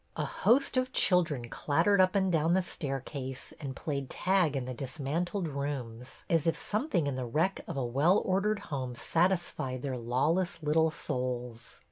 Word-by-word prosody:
A - - -1
host 265 +2 +2
of 255 0 +1
children 160 -10 +3
clattered 170 - +2
up 185 +1 +3
and 190 -2 +2
down 165 +1 +3
the 190 - +2
staircase 135 -4 -5
and 135 -3 -5
played 140 -3 -3
tag 180 -5 +2
in 130 -2 -2
the 130 - -4
dismantled 155 - -3
rooms, 135 -4 -5
as 165 -4 +2
if 165 - +2
some 220 +9 -1
thing 175 - +1
in 140 -2 -1
the 130 - -2
wreck 160 +10 0
of - - -5
a 130 - 0
well 145 +11 +3
ordered 200 +3 +1 0.2
home 130 -3 -3
satis 175 +6 +1
fied 130 -1 -4
their 135 -3 -2
lawless 155 +9 0
little 160 +2 +3
souls. 125 -5 -4
150 Hz, 175 wpm, -30 LUFS, 130-180 Hz, 0.2 s, children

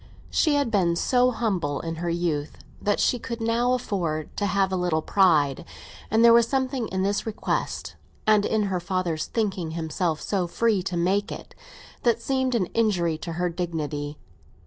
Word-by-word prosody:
She 305 -3 +3
had 285 -5 +1
been 180 -5 +2
so 250 +7 +3
humble 190 - -1
in 165 0 -5
her 170 +1 -2
youth 170 -4 -2 0.2
that 205 - +1
she 245 - +2
could 235 +1 -5
now 230 +2 +1
afford 170 -11 -2
to 205 - 0
have 195 -1 +1
a - - 0
little 175 -3 0
pride, 155 -9 +3 0.5
and 225 +2 +4
there 235 - +8
was 235 0 +5
something 260 -3 -1
in 190 0 -2
this 200 +3 -1
request, 220 - -3 0.3
and 215 -1 +4
in 215 0 +1
her 190 -3 -1
father's 175 -3 -2
thinking 190 -8 -2
himself 160 0 -1
so 190 -4 -1
free 220 +2 +1
to 180 -1 -3
make 195 +4 +1
it, - - -8 0.5
that 235 -1 +2
seemed 260 0 0
an 205 -6 +2
injury 180 -8 +1
to 170 - -5
her 175 +2 0
dignity. 155 -4 -3
190 Hz, 175 wpm, -25 LUFS, 170-230 Hz, 0.5 s, there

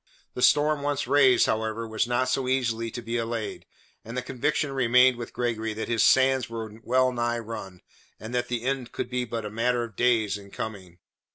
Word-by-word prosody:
The 125 - -5
storm 145 +3 +4
once 145 -1 -1
raised, 130 -1 +5
however, 110 +1 -1
was 110 +1 -1
not 125 +1 +1
so 125 0 0
easily 115 -3 0
to 120 +1 -7
be 115 +1 -2
allayed, 115 -1 -4 0.4
and 115 +3 -7
the 125 - -2
conviction 145 +3 -1
remained 125 -1 +4
with 120 -1 -7
Gregory 115 -3 -2
that 110 - -4
his 115 -3 +2
sands 130 -1 +4
were 110 -1 -7
well 130 +2 +2
nigh 120 -1 -1
run, 110 -5 -7 0.4
and 110 +3 -8
that 125 0 0
the 120 -2 -3
end 130 -2 -2
could 125 - -4
be 125 0 -1
but 115 -2 -4
a 105 - -5
matter 120 +2 0
of 115 -3 -8
days 110 -4 +2
in 100 0 -14
coming. 95 -5 -7
120 Hz, 200 wpm, -26 LUFS, 110-125 Hz, 0.4 s, raised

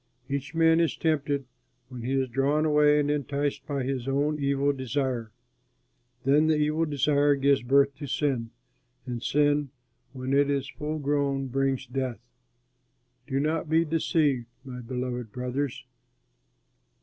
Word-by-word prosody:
Each 140 +1 -4
man 165 0 +4
is 165 -2 +1
tempted 145 -3 0 0.4
when 125 -2 -8
he 125 +3 -2
is 135 -1 +1
drawn 140 +5 +1
away 150 -1 +4
and 145 0 +1
enticed 145 0 -2
by 140 -3 -2
his 130 -1 -3
own 145 +3 0
evil 140 +1 +2
desire. 130 -3 -2 0.9
Then 145 +4 +4
the 160 - +3
evil 155 +2 +1
desire 145 0 +2
gives 140 0 +3
birth 140 +3 +3
to 145 - -6
sin, 130 -4 -1 0.6
and 120 -2 -4
sin, 145 +1 +2 0.4
when 130 0 -4
it 140 0 +4
is 140 -1 0
full 150 +2 -4
grown, 140 -2 0
brings 135 0 0
death. 130 -2 -3 1.1
Do 135 -1 0
not 155 +2 -1
be 165 +1 +3
deceived, 150 -6 +1 0.2
my 125 -1 -7
beloved 125 -2 -4
brothers. 125 +3 -3
140 Hz, 140 wpm, -27 LUFS, 130-150 Hz, 1.1 s, man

